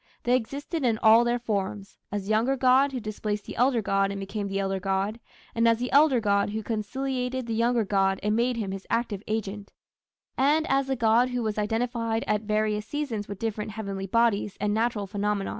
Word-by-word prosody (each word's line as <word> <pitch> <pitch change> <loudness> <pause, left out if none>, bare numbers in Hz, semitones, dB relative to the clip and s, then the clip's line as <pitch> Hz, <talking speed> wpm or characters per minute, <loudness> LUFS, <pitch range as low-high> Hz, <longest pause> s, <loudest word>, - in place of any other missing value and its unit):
They 245 +1 +3
existed 280 +6 -3
in 230 -3 +2
all 225 +1 +7
their 240 0 +1
forms 205 -3 -3 0.2
as 205 -1 -2
the 200 - -4
younger 235 +5 +2
god 260 +2 +4
who 260 - -3
displaced 210 -1 -4
the - - -7
elder 245 -2 +2
god 195 0 +1
and 200 0 -4
became 200 +1 -4
the 195 0 -3
elder 195 -1 -1
god, 195 +4 -1 0.3
and 230 0 +2
as 230 0 +4
the 250 +2 -3
elder 285 -3 +5
god 200 -2 +1
who 215 +1 -4
conciliated 250 +3 -2
the 230 - -3
younger 230 0 +2
god 195 -1 +1
and 210 +1 +1
made 240 +1 +1
him 205 -4 -3
his 195 0 -7
active 230 -4 -1
agent; 205 -2 -4 0.7
and 300 +4 +3
as 270 0 +2
the 265 - 0
god 235 +1 +3
who 245 -1 -2
was 215 -1 -2
identified 225 +1 -1
at 210 -1 0
various 215 0 -1
seasons 250 -8 -3
with 200 - -6
different 215 -1 -3
heavenly 200 -3 -5
bodies 215 -2 +1
and 210 0 0
natural 220 -2 0
phenomena. 205 0 -2
220 Hz, 205 wpm, -26 LUFS, 205-245 Hz, 0.7 s, all